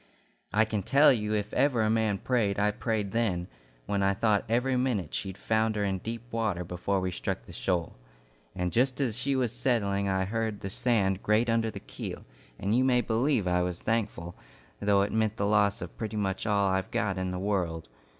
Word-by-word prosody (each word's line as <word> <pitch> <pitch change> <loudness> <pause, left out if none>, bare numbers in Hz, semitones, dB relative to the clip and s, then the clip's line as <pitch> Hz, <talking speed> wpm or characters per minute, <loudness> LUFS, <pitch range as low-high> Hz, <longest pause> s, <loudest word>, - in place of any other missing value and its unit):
I 105 +4 +4
can 110 -2 -2
tell 140 +8 +5
you 105 -2 -1
if 105 0 -3
ever 130 -4 +2
a 110 - +2
man 110 -3 +1
prayed, 110 -4 0
I 105 +1 +2
prayed 105 -2 -2
then, 100 -6 0 0.4
when 100 0 -1
I 100 0 +2
thought 105 -1 +2
every 125 +3 +1
minute 125 - -1
she'd 95 -1 -3
founder 110 -1 0
in 95 -2 -1
deep 115 +3 -5
water 110 -6 -1
before 90 +3 -1
we 95 0 -2
struck - - -4
the - - -12
shoal. 90 -3 -1 0.6
And 90 -1 -1
just 130 +3 +1
as 125 -6 0
she 135 +3 0
was 125 -3 0
settling 100 -6 0
I 95 0 +1
heard 110 0 -2
the 95 - -5
sand 100 -5 +1
grate 110 +3 +2
under 115 -1 +1
the - - -7
keel, - - -7 0.3
and 100 +4 0
you 130 - +4
may 125 -2 +3
believe 115 -2 +1
I 90 0 +2
was 90 -1 -2
thankful, 100 -6 -2 0.5
though 100 -1 +3
it 100 - -3
meant 110 -1 +1
the 100 - 0
loss 100 -2 +2
of 85 - -9
pretty 110 -1 -3
much 95 0 -2
all 100 -2 +2
I've 95 0 -1
got 105 -5 -1
in 95 0 -1
the 90 - -3
world. 90 -6 -1
105 Hz, 205 wpm, -29 LUFS, 95-115 Hz, 0.6 s, tell